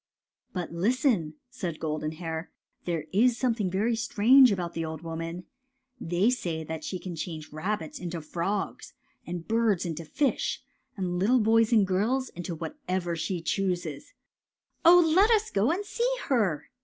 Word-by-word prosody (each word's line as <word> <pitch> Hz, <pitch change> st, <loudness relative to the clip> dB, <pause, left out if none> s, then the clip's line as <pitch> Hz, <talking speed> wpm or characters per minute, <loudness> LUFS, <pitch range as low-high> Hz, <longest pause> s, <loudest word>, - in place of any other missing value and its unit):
'' -, -, -67 dB
But 180 Hz, -2 st, -4 dB
listen," 205 Hz, -, +1 dB, 0.2 s
said 185 Hz, -10 st, -5 dB
Golden 155 Hz, 0 st, -2 dB
Hair. 160 Hz, 0 st, -5 dB, 0.3 s
^* -, -, -37 dB
There 165 Hz, -3 st, -2 dB
is 235 Hz, +4 st, +4 dB
something 230 Hz, -6 st, 0 dB
very 210 Hz, +6 st, +1 dB
strange 240 Hz, +3 st, +5 dB
about 175 Hz, -3 st, -2 dB
the 165 Hz, -, -2 dB
old 160 Hz, 0 st, -6 dB
woman. 165 Hz, +2 st, -5 dB, 0.6 s
They 175 Hz, +7 st, +2 dB
say 165 Hz, -10 st, -3 dB, 0.2 s
she 185 Hz, +4 st, -4 dB
can 175 Hz, 0 st, -7 dB
change 155 Hz, -2 st, -6 dB
rabbits 165 Hz, +1 st, -3 dB
into 175 Hz, -1 st, -4 dB
frogs 175 Hz, +6 st, -3 dB, 0.3 s
and 175 Hz, -1 st, -5 dB
birds 225 Hz, -5 st, +2 dB
into 165 Hz, -1 st, -4 dB
fish 265 Hz, -, -1 dB, 0.3 s
and 180 Hz, -2 st, -2 dB
little 240 Hz, +7 st, +4 dB
boys 225 Hz, +1 st, +3 dB
and 215 Hz, -4 st, +5 dB
girls 225 Hz, +8 st, 0 dB
into 175 Hz, 0 st, -6 dB
whatsoever 180 Hz, -, -3 dB
she 170 Hz, +1 st, -3 dB
chooses." 175 Hz, -3 st, -2 dB
^' -, -, -23 dB, 0.8 s
Oh, 340 Hz, -1 st, +7 dB
let 400 Hz, +4 st, +6 dB
us 440 Hz, -2 st, +2 dB
go 205 Hz, +4 st, +2 dB
and 390 Hz, +5 st, -2 dB
see -, -, 0 dB
her! 210 Hz, -, +1 dB
185 Hz, 160 wpm, -28 LUFS, 165-235 Hz, 0.8 s, Oh